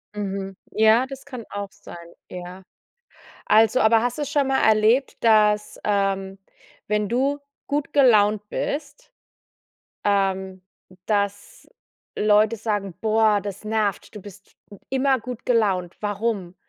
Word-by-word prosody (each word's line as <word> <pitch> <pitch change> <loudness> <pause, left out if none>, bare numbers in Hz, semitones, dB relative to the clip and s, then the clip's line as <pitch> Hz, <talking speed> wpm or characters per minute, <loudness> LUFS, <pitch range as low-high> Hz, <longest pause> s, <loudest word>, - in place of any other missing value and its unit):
Mhm. 195 -1 -4 0.2
Ja, 220 +4 +4
das 270 0 -10
kann 255 -4 -8
auch 200 -1 -6
sein, 170 -1 -12 0.2
ja. 180 +1 -9 0.8
Also 220 +4 +4
aber 225 0 +4
hast 245 0 -1
du - - -2
es 290 - -4
schon 290 -3 +1
mal 265 0 +1
erlebt, 220 +5 +3
dass, 210 -2 +3
ähm, 195 -1 -1 0.5
wenn 210 0 0
du 270 +4 0 0.3
gut 290 0 -2
gelaunt 215 -6 +4
bist 285 +5 -5 0.9
ähm, 190 -2 0 0.4
dass 205 -1 -3 0.5
Leute 215 +2 +3
sagen: 205 -3 -3
„Boah, 220 -1 +3
das 200 0 -7
nervt. 215 -2 -2
Du 210 - -8
bist 200 0 -15 0.3
immer 265 0 +1
gut 250 +1 -8
gelaunt. 195 -7 +1
Warum?" 205 -3 -3
210 Hz, 125 wpm, -23 LUFS, 200-235 Hz, 0.9 s, Ja